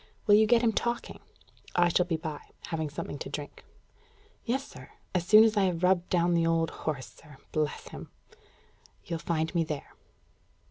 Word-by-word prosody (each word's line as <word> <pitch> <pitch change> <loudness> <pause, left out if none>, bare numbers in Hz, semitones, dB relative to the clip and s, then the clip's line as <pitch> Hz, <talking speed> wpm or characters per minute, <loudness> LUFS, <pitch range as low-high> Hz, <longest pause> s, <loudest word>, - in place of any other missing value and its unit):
Will 205 - +5
you 215 +1 +6
get 240 +1 +4
him 225 -1 +3
talking? 235 +2 -2 0.6
I 175 0 +4
shall 180 +1 +2
be 165 -2 0
by, 155 -2 -5 0.3
having 160 -2 -2
something 145 0 -6
to - - -6
drink." 145 -1 -7 0.8
"Yes, 265 +4 -2
sir. - - -12 0.2
As 180 -1 -1
soon 215 0 +9
as 220 -1 +3
I 200 -2 +3
have 180 -2 -1
rubbed 180 -1 +3
down 175 -1 +2
the 165 -1 +2
old 165 0 +1
horse, 145 -5 -4
sir 150 -3 -17
bless 155 -1 -2
him!" - - -9 1.0
"You'll 170 -1 -3
find 160 0 -1
me 170 -2 +2
there." 150 -3 -6
170 Hz, 180 wpm, -29 LUFS, 160-205 Hz, 1.0 s, soon